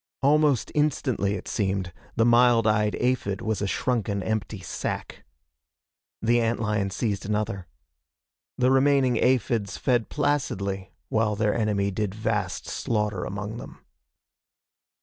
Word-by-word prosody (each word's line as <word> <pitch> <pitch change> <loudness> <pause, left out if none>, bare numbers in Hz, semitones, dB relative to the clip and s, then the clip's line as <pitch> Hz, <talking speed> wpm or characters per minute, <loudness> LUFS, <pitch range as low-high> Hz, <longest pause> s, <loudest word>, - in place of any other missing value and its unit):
Almost 145 -2 +3
instantly, 130 -9 +1
it 95 - -7
seemed, 95 -3 -1 0.2
the 115 - +3
mild 120 -1 +5
eyed 105 -1 +2
aphid 125 -6 0
was 110 -1 -2
a 100 - 0
shrunken 105 -3 -1
empty 110 -1 -2
sack. 95 - -5 1.0
The 120 +1 +3
ant 115 +1 0
lion 105 -3 0
seized 100 +1 -2
another. 105 -3 -2 0.9
The 125 +1 +3
remaining 135 -2 +4
aphids 115 -5 +1
fed 120 -4 +1
placidly 100 -10 -1 0.2
while 110 -1 +1
their 105 0 +1
enemy 105 -3 0
did 100 0 -2
vast 105 -4 -2
slaughter 105 -4 -1
among 105 +3 -5
them. - - -9
110 Hz, 125 wpm, -26 LUFS, 100-120 Hz, 1.0 s, mild